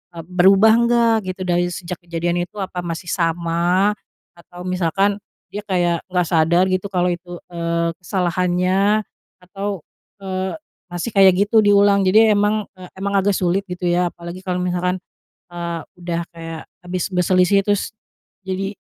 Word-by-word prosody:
eee, 165 - -7
berubah 190 +4 +5
enggak, 235 0 +3 0.2
gitu, 185 - -11
dari 175 0 +1
sejak 175 0 -6
kejadian 170 0 -2
itu, 175 +4 -11
apa 185 -2 -4
masih 170 0 -5
sama? 170 +3 +1 0.4
Atau 175 +1 -12
misalkan, 190 +3 0 0.3
dia 205 - -4
kayak 175 -3 +1
nggak 180 -2 0
sadar 170 +2 +3
gitu, 185 +2 -1
kalau 180 -2 +1
itu, 175 0 -8 0.2
eee, 170 0 -1
kesalahannya, 185 +3 +1 0.4
atau, 195 -1 -5 0.3
eee, 190 +1 -3 0.3
masih 175 +6 -4
kayak 195 -2 +6
gitu 220 +2 +3
diulang, 200 -1 +4
jadi 215 +3 +5
emang, 205 +1 +1
eee, 185 -1 -12
emang 200 +1 -3
agak 200 +1 +1
sulit 180 +2 +1
gitu 180 0 -5
ya, 175 0 +2
apalagi 170 +2 -9
kalau 185 -1 -2
misalkan, 180 0 -1 0.6
eee, 170 -1 -4 0.2
udah 170 -1 -3
kayak 165 -1 -7 0.2
habis 180 0 -3
berselisih, 185 +2 +3
terus, 205 +1 -1 0.5
jadi 195 +2 -3
180 Hz, 145 wpm, -20 LUFS, 175-195 Hz, 0.6 s, kayak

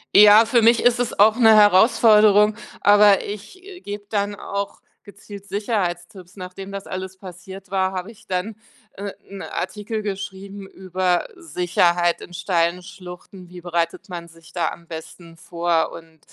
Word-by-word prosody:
Ja, 210 +2 +8
für 235 +1 +2
mich 230 +1 +4
ist 245 0 +3
es 245 - -2
auch 215 +2 +6
'ne 225 -3 +6
Herausforderung, 210 0 +5 0.3
aber 205 -1 +5
ich, 210 - -9
äh, 380 -2 -12
gebe 205 0 -8
dann 210 - -2
dann 205 0 -2
auch 200 0 -5 0.2
gezielt 200 0 -13
Sicherheitstipps. 185 -3 -4
Nachdem 185 +2 -9
das 195 0 -7
alles 190 0 -7
passiert 190 +1 -12
war, 190 -1 0
habe 185 +3 -5
ich 230 0 -20
dann, 190 +4 -3 0.4
äh, 200 0 -6 0.2
'n 195 -1 -9
Artikel 215 +1 -5
geschrieben 200 -1 -7
über 185 -1 -2
Sicherheit 175 - 0
in 175 - -12
steilen 175 0 -1
Schluchten, 180 0 -12
wie 180 -1 -11
bereitet 170 +2 -3
man 170 -1 -7
sich 165 0 -19
da 170 -3 -1
am 170 -1 -12
besten 165 +1 -11
vor 170 -1 -1
und 165 -1 -13
195 Hz, 160 wpm, -21 LUFS, 175-210 Hz, 0.4 s, Ja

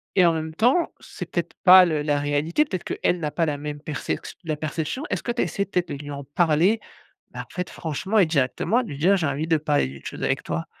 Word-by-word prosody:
et 185 - +6
en 170 - +4
même 160 0 -4
temps, 250 - +3
c'est - - -8
peut-être - - -2
pas 185 -1 +9
le 155 -3 0
la 145 -1 +1
réalité, 145 - +1
peut-être 185 - -4
qu'elle 175 - -1
n'a 150 - -2
pas 165 +2 0
la 145 -2 -2
même 150 0 -5
percex 150 0 -4
la 160 -2 -2
perception. 155 - -3
Est-ce - - -1
que 240 - -2
tu 240 - -1
as - - +2
essayé 200 - -2
peut-être 180 -2 -1
de - - -3
lui 145 +1 -7
en 140 -1 -6
parler? 165 +8 +2 0.5
Bah, - - -6
en - - -35
fait, 180 0 -3
franchement 175 +7 -2
et 190 - +6
directement 160 - +1
de - - -8
lui 140 - -6
dire: 185 +7 +4
«J'ai 165 -5 0
envie 140 +3 -1
de 165 -1 +3
parler 150 - +1
d'une 70 0 -11
chose - - -6
avec - - 0
toi?» 80 +1 -3
160 Hz, 255 wpm, -24 LUFS, 145-185 Hz, 0.5 s, pas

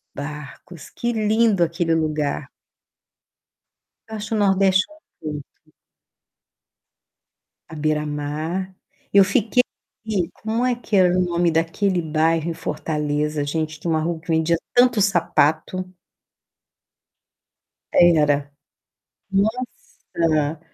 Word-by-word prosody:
barcos, 150 +3 -8
que 240 0 -1
lindo 215 -3 +2
aquele 165 0 0
lugar. 155 -2 -1 1.6
Eu 220 - -6
acho 210 +1 -5
o - - +1
Nordeste 195 -1 +3 0.4
muito 150 -2 -5
bonito. - - -32 2.0
À 160 - -9
beira-mar. 150 +3 -2 0.5
Eu 200 0 +8
fiquei 210 +5 +2 0.7
como 225 +3 -2
é 250 -1 +1
que 230 -3 -3
era 180 -2 +5
o - - +3
nome 175 -1 +1
daquele 175 +3 0
bairro 160 +1 +1
em - - -2
Fortaleza, 150 -1 -2
gente, 155 +1 -3
que 170 - -6
uma 160 -1 +2
rua 165 +1 -2
que 160 - -22
vendia 160 +1 +2 0.2
tanto 245 -3 +4
sapato. 185 0 +1 2.0
Era. 150 -5 +4 0.8
Nossa! 170 -8 -1
165 Hz, 100 wpm, -22 LUFS, 155-195 Hz, 2.0 s, Eu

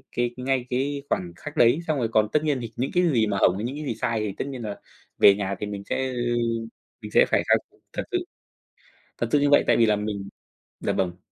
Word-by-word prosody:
cái 120 0 +1
ngay 130 -1 0
cái 140 +3 -1
khoảnh 90 -1 -1
khắc 150 +10 -9
đấy, 120 +6 +5
xong 155 -2 +1
rồi 120 - 0
còn 110 -1 +3
tất 150 - +2
nhiên 145 -4 +1
thì 115 -1 -6
những 130 +3 -2
cái 180 - +3
gì 115 -4 +2
mà 100 -1 -1
hổng, 90 -1 +3
những 130 +3 -4
cái 150 - -5
gì 115 - -2
sai 115 0 -1
thì 105 -2 -2
tất - - -3
nhiên 130 -3 -6
là 105 -2 -5 0.4
về 100 - +8
nhà 100 -1 -2
thì - - -3
mình 100 -1 -6
sẽ, 130 +1 0
ơ, - - -5 0.9
mình - - -8
sẽ - - +6
phải - - +2
thật - - +1 0.2
thật - - -2
sự. 365 - +2 1.0
Thật - - -1
sự 145 - +4
như 145 0 +3
vậy, 145 - +6
tại - - +4
vì 115 - +5
là 105 -1 +3
mình 105 -2 -4 0.5
dạ, - - -1
vâng. 90 -2 -1
120 Hz, 250 wpm, -25 LUFS, 105-140 Hz, 1.0 s, về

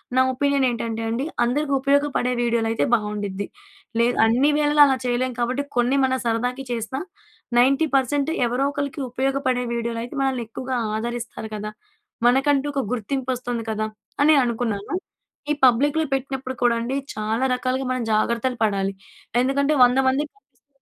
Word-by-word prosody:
నా 260 - +5
ఒపీనియన్ 280 +1 +1
ఏంటంటే 230 -1 -3
అండి, 235 +5 -1 0.2
అందరికి 280 +4 0
ఉపయోగపడే 280 -2 +1
వీడియోలైతే 230 -1 +1
బాగుండిద్ది. 205 -2 -3 0.5
లేదు 240 +1 +3
అన్ని 245 +6 +3
వేళలా 295 0 +3
అలా 265 -1 +2
చేయలేం 250 +1 0
కాబట్టి, 250 +4 0
కొన్ని 245 +3 +3
మనం 260 0 +1
సరదాకి 245 +3 -1
చేస్తా 235 +3 -3 0.6
90% 275 +1 +2 0.2
ఎవరో 245 +3 0
ఒకరికి 285 +1 -3
ఉపయోగపడే 260 -1 0
వీడియోలైతే, 235 +2 -3
మనల్ని 260 -3 0
ఎక్కువగా 255 +3 -4 0.2
ఆదరిస్తారు 235 0 -4
కదా! 210 0 -5 0.5
మనకంటూ 270 +3 +3
ఒక 275 - 0
గుర్తింపొస్తుంది 250 0 -2
కదా! 215 0 -1 0.4
అని 305 +2 +6
అనుకున్నాను. 225 - -2 0.6
ఈ - - +4
పబ్లిక్‌లో 285 +6 +3
పెట్టినప్పుడు 265 -1 -3
కూడా 240 -1 +4
అండి, 255 +4 -2 0.2
చాలా 220 +4 -1
రకాలుగా 255 +1 -2
మనం 255 -1 -1
జాగ్రత్తలు 235 +3 0
పడాలి. 195 -2 0 0.5
ఎందుకంటే, 280 +3 +1
100 250 +1 +4
మందికి 285 +3 0
కనిపిస్తుంది, 275 0 -38
250 Hz, 135 wpm, -23 LUFS, 235-275 Hz, 0.6 s, అని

